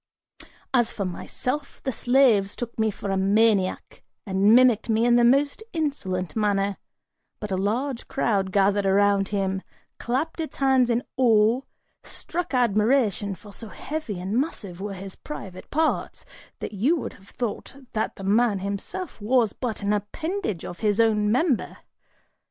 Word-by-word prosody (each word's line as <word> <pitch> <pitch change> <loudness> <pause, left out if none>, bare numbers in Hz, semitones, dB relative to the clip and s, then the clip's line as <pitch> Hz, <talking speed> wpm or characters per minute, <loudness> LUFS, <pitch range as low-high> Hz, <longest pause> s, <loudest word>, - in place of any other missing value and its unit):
As 240 -3 +3
for 200 - -3
myself, 255 +10 -4
the 265 - -1
slaves 240 -6 +3
took 235 -2 -6
me 220 0 +3
for 200 -1 -5
a 195 - +1
maniac, 200 0 +1 0.2
and 200 +2 +4
mimicked 245 -3 +4
me 225 +1 +3
in 240 0 +5
the 240 - +5
most 280 - +3
insolent 190 - -2
manner, 200 -2 +1 0.6
but 210 -1 -5
a - - +1
large 235 +7 -1
crowd 195 -4 0
gathered 200 0 +2
around 200 0 +3
him, 195 -2 -1 0.4
clapping 310 +7 -2
its - - -13
hands 265 -3 +3
in 235 +1 +1
awe 230 -1 +4 0.4
struck 345 -4 -5
admiration, 215 -3 +2
for 205 +2 -14
so 225 - -7
heavy 285 - -5
and 200 +7 0
massive 195 - -6
were 200 -1 -4
his 190 0 -8
private 190 -11 -9
parts, 315 +1 -1 0.4
that - - -5
you 245 - +2
would 315 - -4
have 195 +1 -18
thought 240 +2 -5 0.2
that 220 - -1
the 195 - -9
man 210 +2 +3
himself 200 - -5
was 230 0 +2
but 225 -5 -4
an 200 +1 +1
appendage 215 - -3
of 175 - -7
his 210 -1 +1
own 210 -2 +3
member! 260 +1 +1
220 Hz, 155 wpm, -25 LUFS, 200-255 Hz, 0.6 s, in